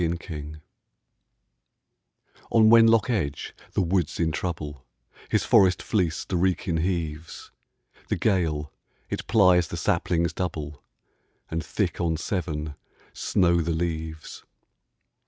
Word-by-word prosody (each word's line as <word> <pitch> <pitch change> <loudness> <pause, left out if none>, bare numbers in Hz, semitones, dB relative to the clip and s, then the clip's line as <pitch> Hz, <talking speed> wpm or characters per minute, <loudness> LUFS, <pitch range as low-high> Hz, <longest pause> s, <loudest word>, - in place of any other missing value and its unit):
XXXI 80 -3 -4 1.9
On 110 -1 +5
Wenlock 115 -1 +6
Edge 75 -11 -2 0.2
the - - +1
wood's 90 -2 0
in 80 -2 +1
trouble; 75 -5 -4 0.5
His - - +1
forest 95 -2 +4
fleece 90 -7 0
the 90 - -2
Wrekin 90 -1 0
heaves; 80 -2 -3 0.6
The - - 0
gale, 80 -8 0 0.4
it - - -4
plies 90 -6 +4
the - - -6
saplings 85 -1 0
double, 75 -5 -4 0.7
And 80 0 -2
thick - - -2
on 80 -2 0
Severn 80 -4 -3 0.4
snow 85 -2 +2
the 85 +1 -1
leaves. 80 -1 -4
85 Hz, 110 wpm, -25 LUFS, 80-90 Hz, 1.9 s, Wenlock